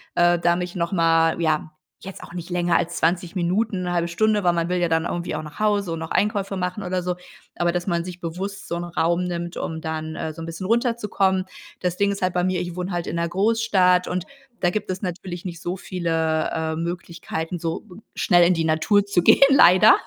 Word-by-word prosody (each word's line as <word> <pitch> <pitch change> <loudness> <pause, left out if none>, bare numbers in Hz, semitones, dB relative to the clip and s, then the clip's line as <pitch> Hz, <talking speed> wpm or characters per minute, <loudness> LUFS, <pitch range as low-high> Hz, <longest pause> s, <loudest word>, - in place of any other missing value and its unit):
äh, 175 0 +4
da 170 0 +2
mich 180 0 -4
noch 170 0 -1
mal, 165 -2 +3
ja 155 -1 0 0.3
jetzt 195 0 -9
auch - - -11
nicht 175 0 -7
länger 175 -1 +1
als 170 +1 -2
20 175 +2 0
Minuten, 185 +2 0
'ne 175 0 -2
halbe 170 0 +1
Stunde, 210 +3 +2
weil 175 -1 +3
man 170 0 -1
will 180 - +1
ja 175 -1 +1
dann 165 0 +1
irgendwie 175 -2 -3
auch 155 - -3
nach 150 +4 -11
Hause 205 -4 +1
und - - -3
noch 160 - -6
Einkäufe 200 -2 0
machen 180 +3 -3
oder 180 0 -1
so. 180 0 -2 0.4
Aber 175 0 +2
dass 175 +2 -3
man 170 -2 0
sich 180 0 -8
bewusst 190 +4 -5
so - - -3
'n 170 - -3
Raum 170 +1 0
nimmt, 175 -1 -4
um 160 -1 -4
dann, 160 0 -4
äh, 160 - -3
so 165 - -9
'n - - -5
bisschen 165 +3 -5
runterzukommen. 210 -5 +1 0.3
Das 180 -1 -2
Ding 200 0 +2
ist 200 - -5
halt 185 -1 +1
bei 180 0 +1
mir, 185 -1 0
ich 175 -1 -5
wohne 180 +1 -4
halt 175 -1 -3
in - - -3
'ner 170 0 0
Großstadt 195 -3 +3
und 180 0 -2 0.4
da 175 - +3
gibt 215 0 -3
es 185 0 -3
natürlich 180 -1 -5
nicht 170 -2 -6
so 175 +1 -3
viele, 165 -4 -1
äh, 160 0 -2
Möglichkeiten, 170 0 -4
so 165 0 -3 0.3
schnell 175 -2 +4
in 180 - +4
die 165 - 0
Natur 195 +6 +3
zu 195 -3 +2
gehen 175 - +5
leider, 215 -5 +7
175 Hz, 230 wpm, -23 LUFS, 170-185 Hz, 0.4 s, leider